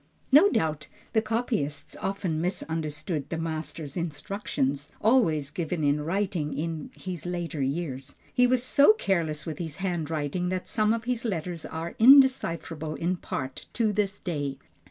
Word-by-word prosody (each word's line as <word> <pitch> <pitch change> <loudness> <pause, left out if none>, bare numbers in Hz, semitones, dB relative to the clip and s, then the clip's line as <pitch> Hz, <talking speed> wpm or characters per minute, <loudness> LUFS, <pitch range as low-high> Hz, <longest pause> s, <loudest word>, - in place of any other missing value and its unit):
No 305 +9 +8
doubt 155 - 0 0.3
the 220 - +4
copyists 215 - -2
often 190 -5 -1
misunderstood 160 -3 -3
the 165 - -2
master's 160 -2 -4
instructions, 145 -4 -2
always 165 - +3
given 165 0 -2
in 145 +1 +2
writing 170 -5 -1
in 160 0 -3
his 180 -4 -6
later 175 -4 -3
years. 135 -1 -3 0.2
He 250 0 +5
was 250 -1 +2
so 285 +8 +6
careless 165 - -1
with 155 -3 -5
his 160 -4 -4
handwriting 170 -2 -2
that 185 0 -3
some 215 -1 +2
of 230 0 0
his 245 -1 -2
letters 175 -6 -3
are 165 +1 -5
undecipherable 220 - +5
in 180 +2 -1
part, 130 -5 -5
to 220 -3 +1
this 205 -1 0
day. 145 -7 -3
170 Hz, 145 wpm, -27 LUFS, 150-200 Hz, 0.3 s, No